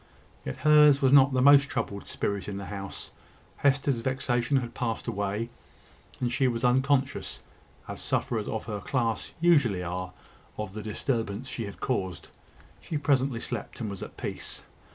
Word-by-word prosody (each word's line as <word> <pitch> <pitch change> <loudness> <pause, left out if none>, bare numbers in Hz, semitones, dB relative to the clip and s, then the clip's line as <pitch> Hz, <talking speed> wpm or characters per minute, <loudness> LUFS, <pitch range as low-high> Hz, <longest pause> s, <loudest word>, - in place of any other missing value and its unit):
Yet 65 - -5
hers 150 -2 +6
was 135 -1 +3
not 140 -1 +7
the 130 -1 +2
most 140 0 +7
troubled 115 -7 -3
spirit 100 -2 -2
in 100 - -4
the 100 - -6
house. 100 -1 -6 0.5
Hester's 140 -2 +2
vexation 130 +1 0
had 120 -2 -3
passed 115 -3 -2
away, 105 +3 -2 0.7
and 125 -1 -1
she 130 0 +3
was 120 0 -2
unconscious, 130 +2 +1 0.5
as - - -6
sufferers 110 -3 -1
of 110 - -3
her 105 -2 -4
class 120 -2 -1
usually 140 - +4
are, 90 +1 -4 0.5
of 105 -3 -5
the 110 - -5
disturbance 110 +1 -2
she 115 -3 -4
had 100 - -9
caused. 95 -9 -2 0.5
She 155 - -3
presently 135 -4 +1
slept - - -5
and 110 -4 -3
was 100 - -7
at - - -8
peace. - - -5
120 Hz, 160 wpm, -28 LUFS, 105-135 Hz, 0.7 s, not